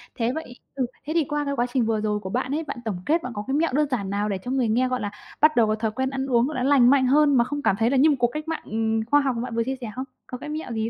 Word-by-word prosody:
thế 235 +1 0
vậy 290 -6 -7 0.2
ừ, 260 -2 0 0.2
thế 310 - -3
thì 335 - +3
qua 295 +1 -2
cái 280 - -1
quá 240 - +1
trình 250 -4 +2
vừa 220 -1 0
rồi 210 -1 0
của 190 - -7
bạn 255 +5 -2
ấy, 315 +3 -1
bạn - - -6
tổng 190 -5 -3
kết 325 +2 +1
bạn 250 - -5
có 205 - -3
cái 270 - -1
mẹo 315 -1 +1
đơn 300 +2 +2
giản 200 -7 -1
nào 205 +1 -1
để 195 - -1
cho 250 - -4
người 260 -3 +1
nghe, 245 +4 +2
gọi 255 0 -2
là, 205 - -3 0.3
bắt 305 +1 +5
đầu 230 -2 +4
có 215 - +1
thói 220 0 -2
quen 260 +3 -1
ăn 270 0 -3
uống 250 0 +2
là 255 -5 -3
nó 270 - +2
lành 260 -4 +6
mạnh 270 -1 +4
hơn 285 +1 +4
mà 235 - +5
không 290 +4 -4
cảm 195 - +2
thấy 225 +1 +3
là 275 - +2
như 290 +4 +6
một 295 - +3
cuộc 240 - +4
cách 305 +6 -6
mạng, 325 -1 -3
ừm, 220 0 -1
khoa 290 +5 +4
học 265 -3 0
mà 230 - -2
bạn 240 -1 -5
vừa 230 - +1
chia 265 +2 -3
sẻ 225 - -5
không? 260 - -4 0.2
Có 250 - -6
cái 295 - -8
mẹo 305 -4 -5
gì 220 0 -1
255 Hz, 360 wpm, -24 LUFS, 225-285 Hz, 0.3 s, lành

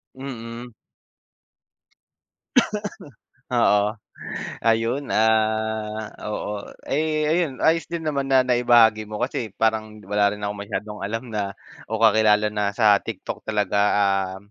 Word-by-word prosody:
Mm. 120 -2 -8 2.8
Oo. 105 -3 +2 0.6
Ayun, 115 +5 +1
ah, 110 0 +1 0.2
oo. 105 -1 -4 0.2
Ay, 155 +1 0
ayun, 160 -4 0
ayos 165 +1 +4
din 170 -2 -4
naman 140 -2 -1
na 130 -1 +5
naibahagi 120 -3 +5
mo 105 - -4
kasi 120 -3 -2
parang 110 -1 0
wala 105 0 +2
rin - - -10
akong 100 0 -4
masyadong 105 0 -5
alam 115 +3 -4
na 100 -2 -1 0.4
o 110 - -1
kakilala 110 -1 +4
na 105 -1 0
sa 105 -3 +6
TikTok - - -6
talaga. 105 -2 0 0.2
Ah, 95 -2 +1
110 Hz, 115 wpm, -23 LUFS, 105-125 Hz, 2.8 s, sa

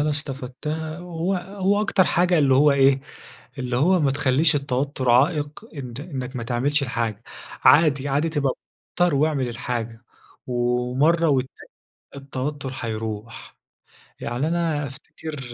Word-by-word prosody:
أنا 150 +1 +1
استفدتها، 150 +3 -4
هو 175 +1 -2
هو 195 +2 0
أكتر 195 -2 +3
حاجة 175 0 +2
اللي 140 -3 +4
هو 145 +2 +5
إيه، 135 -1 +4 0.6
اللي 125 -2 -2
هو 175 +7 +3
ما 140 -3 +2
تخليش 140 +3 +3
التوتر 135 -1 -1
عائق 145 - +1
إن 125 -4 -7
إنك 135 -5 -6
ما 120 - -3
تعملش 130 +6 +1
الحاجة. 115 -4 -2 0.4
عادي، 145 -3 +5
عادي 145 +4 +1
تبقى 145 -4 0 0.4
متوتر 175 -3 +2
واعمل 140 -3 +1
الحاجة 115 0 -4 0.4
ومرة 125 +7 +1
والتانية 130 -2 -2 0.5
التوتر 140 0 -4
هيروح. 110 -1 -6 0.6
يعني 125 +6 -2
أنا 165 -4 0
أفتكر 150 +3 -9
140 Hz, 125 wpm, -23 LUFS, 125-160 Hz, 0.6 s, هو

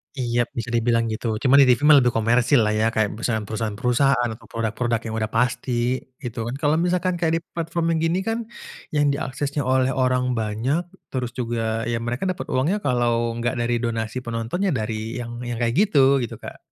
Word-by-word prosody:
Iyap 120 -2 0
bisa 120 0 -4
dibilang 115 0 +2
gitu, 110 0 -2
cuma 135 +4 +5
di 135 - +7
TV 125 +1 +4
mah 150 -2 +8
lebih 125 -1 +3
komersil 120 +3 +3
lah 105 - +1
ya 110 +1 +2
kayak 110 -2 +2
perusahaan 110 0 -2
perusahaan 110 0 -3
perusahaan 125 0 +2
atau - - -15
produk-produk 115 +1 -1
yang 110 - -4
udah 110 - -1
pasti 125 +1 0 0.2
gitu 120 -1 -4
kan. 120 - -3
Kalau 145 +1 +1
misalkan 180 0 0
kayak 165 -1 +2
di - - -5
platform 165 0 -2
yang 160 - 0
gini 165 +3 +1
kan 225 0 0 0.6
yang 145 -1 +3
diaksesnya 140 +1 -3
oleh 130 0 +2
orang 125 -1 +1
banyak, 120 +10 -1 0.3
terus 125 -2 -3
juga, 115 -2 -1
ya 120 -1 -1
mereka 120 +7 -3
dapet 185 -1 -3
uangnya 155 +11 +1
kalo 120 -3 +1
enggak 120 +1 -2
dari 120 0 +1
donasi 115 0 -2
penonton 115 - -2
ya 190 - +2
dari 110 +1 -3
yang 120 0 -7
yang 120 -1 -4
kaya 115 0 +1
gitu 140 -8 +4
gitu, 115 - -5
Kak. - - -9
120 Hz, 195 wpm, -23 LUFS, 115-140 Hz, 0.6 s, mah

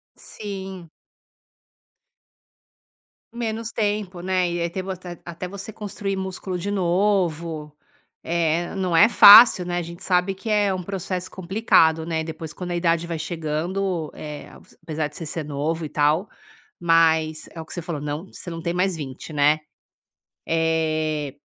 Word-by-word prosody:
Sim. 190 -4 -8 2.4
Menos 230 -1 -3
tempo, 205 -5 -2
né. 185 -1 +1
E 175 0 -2
até 170 +3 -3
bastante 185 -2 -7
até 170 - -8
até 170 +2 -6
você 200 +3 -8
construir 200 -1 -4
músculo 190 -1 -4
de 195 +4 -3
novo, 170 -5 0 0.5
eh, 170 0 0
não 185 -3 0
é 210 +7 +7
fácil, 210 -3 +9
né, 175 0 -2
a 175 - 0
gente 170 +1 -9
sabe 180 +1 +2
que 195 +4 -7
é 205 -2 +2
um 185 - -3
processo 185 -1 -4
complicado, 170 -4 +2
né. 160 -1 -1
Depois, 160 -1 -7
quando 180 +2 -6
a - - -1
idade 170 -1 +1
vai 170 -2 -4
chegando 165 +2 -2
Eh, 150 -1 -8 0.3
apesar 155 -2 -2
de 150 - -19
você 165 - -6
ser 155 +1 -4
novo 150 +3 -2
e - - -6
tal, 150 +6 +1 0.5
mas 160 -2 +2
é 165 - -9
o - - -9
que - - -10
você 175 - -4
falou: 160 -3 -5
não 150 +5 -4
você 185 - -9
não 165 -1 -6
tem 170 +1 -2
mais 180 +1 +1
20, 145 0 -7
né, 150 +1 +3 0.9
eh 155 -3 0
170 Hz, 155 wpm, -23 LUFS, 160-190 Hz, 2.4 s, fácil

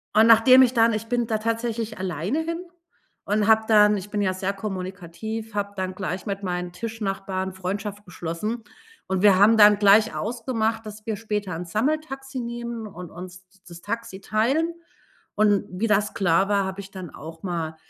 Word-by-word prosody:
Und 220 +1 +6
nachdem 230 +3 +8
ich 255 -1 +4
dann 230 -1 +4
ich 215 +1 -3
bin 240 0 0
da 220 -1 0
tatsächlich 230 0 -2
alleine 185 - -2
hin 335 +2 -4 0.6
und 210 0 +1
habe 220 0 +5
dann 210 -1 +5
ich 195 +1 -7
bin 210 - -1
ja 190 -2 +1
sehr 190 +1 -2
kommunikativ, 195 +3 -6
habe 200 0 -2
dann 185 -1 -3
gleich 190 -1 -4
mit 200 0 -4
meinen 180 -1 -3
Tischnachbarn 195 -2 -4
Freundschaft 200 +2 -5
geschlossen, 180 +7 -4 0.4
und 190 -1 -1
wir 205 -1 +6
haben 215 +3 +6
dann 210 -1 +7
gleich 210 +2 +5
ausgemacht, 225 -1 -2
dass 215 0 -10
wir 220 -3 -2
später 210 -4 -3
'n 175 +2 -5
Sammeltaxi 270 - -2
nehmen 235 -2 -5
und 180 -3 -10
uns 180 +1 -10
d 195 +1 -27
das 170 0 -11
Taxi 230 -4 -5
teilen. 270 +13 +1 0.6
Und 205 -1 +3
wie 195 +5 -1
das 210 0 +1
klar 190 0 +2
war, 200 -1 +2
hab 190 +1 -5
ich 195 -1 -8
dann 185 -4 -8
auch 160 +3 -10
mal, 165 -4 -3
210 Hz, 180 wpm, -24 LUFS, 190-225 Hz, 0.6 s, nachdem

